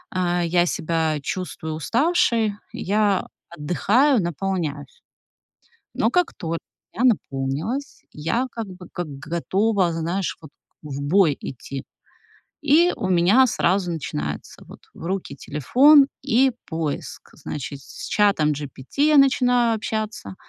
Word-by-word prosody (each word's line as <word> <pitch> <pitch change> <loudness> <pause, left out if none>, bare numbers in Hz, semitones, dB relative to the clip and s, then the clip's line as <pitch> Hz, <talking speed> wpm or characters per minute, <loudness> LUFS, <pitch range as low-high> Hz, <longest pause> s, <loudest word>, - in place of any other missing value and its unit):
э, 175 -1 +1
я 175 +1 +3
себя 160 -3 -1
чувствую 160 -1 -4
уставшей, 230 - +1 0.2
я 205 0 +1 0.2
отдыхаю, 195 - +2
наполняюсь. 170 -4 -3 0.9
Но - - +1
как 360 -1 +1
только 165 0 -4 0.4
я 230 - -1
наполнилась, 175 - -1
я 165 +12 -1
как 230 -2 -5
бы, 185 -1 -11
как 175 -3 -4
готова, 185 +5 0
знаешь, 170 +3 -2
вот 155 - -12
к - - -51
в 140 -1 -5
бой 155 0 +3
идти. 135 +1 -7 0.8
И 315 +5 +4
у 195 -6 -3
меня 185 +9 +5
сразу 185 -5 +1
начинается, 75 - -5
вот, - - -13
в - - -11
руки 185 -6 -3
телефон, 270 - +5
и 265 0 +3
поиск, 160 -3 -5
значит, 140 0 -6
с - - -9
чатом 200 -8 +3
GPT 145 - -2
я 305 - +5
начинаю 245 -4 +4
общаться, 215 - -4
180 Hz, 125 wpm, -23 LUFS, 155-230 Hz, 0.9 s, меня